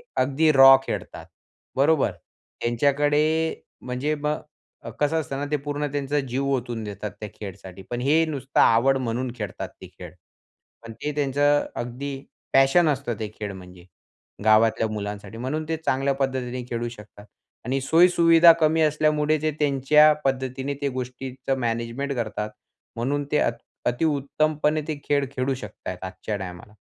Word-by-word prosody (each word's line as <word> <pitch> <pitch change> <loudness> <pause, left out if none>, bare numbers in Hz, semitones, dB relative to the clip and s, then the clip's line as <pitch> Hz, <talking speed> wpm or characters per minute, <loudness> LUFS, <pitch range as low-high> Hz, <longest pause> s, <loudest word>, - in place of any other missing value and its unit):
अगदी 140 +4 +3
रॉ 135 -1 +9
खेळतात. - - -5 0.5
बरोबर. 145 +2 +3 0.5
त्यांच्याकडे 145 +5 +2 0.4
ते - - -27 0.2
म्हणजे 130 +4 -1
मग 150 0 -6
कसं 150 +2 +1
असतं 135 -3 -4
ना 145 - -2
ते 150 - +2
पूर्ण 145 0 -2
त्यांचा 145 0 -1
जीव 135 0 -2
ओतून 120 -3 -4
देतात 105 -1 -6
त्या 105 - -6
खेळसाठी. 95 -2 -9
पण 120 0 -3
हे 155 +5 +3
नुसतं 140 -3 -2
आवड 130 +4 +4
म्हणून 125 0 -2
खेळतात 105 -4 -5
ते - - -9
खेळ. - - -11 0.7
पण 115 -1 -9
ते 145 +7 -4
त्यांचं 145 0 +2
अगदी 135 +4 -5 0.4
पॅशन 135 +5 +5
असतं, 135 -6 -2
ते 110 - -3
खेळ 105 -2 -4
म्हणजे 90 -1 -13 0.6
गावातल्या 110 +1 +4
मुलांसाठी. 105 0 -6
म्हणून 150 +6 -3
ते 160 - 0
चांगल्या 140 -3 0
पद्धतीने 130 -2 -2
खेळू 120 0 -2
शकतात 105 -2 -13 0.4
आणि 130 +2 0
सोयी-सुविधा 165 +2 +6
कमी 160 +1 +3
असल्यामुळे 155 0 +2
ते 155 0 +1
त्यांच्या 150 +1 +5
पद्धतीने, 130 +1 -1
ते 140 - 0
गोष्टीच 130 +1 -7
मॅनेजमेंट 120 +3 -2
करतात. 105 -3 -3 0.5
म्हणून 140 +5 -1
ते 150 - +3
अ, - - +3 0.4
अति 120 +6 +1
उत्तमपणे 155 +1 0
ते 155 - -2
खेळ, 140 -1 +1
खेळू 135 0 -1
शकतात 105 -6 -10
आहेत. 90 - -7
आजच्या 95 +3 -5
टायमाला 90 +2 -9
135 Hz, 150 wpm, -24 LUFS, 115-145 Hz, 0.7 s, रॉ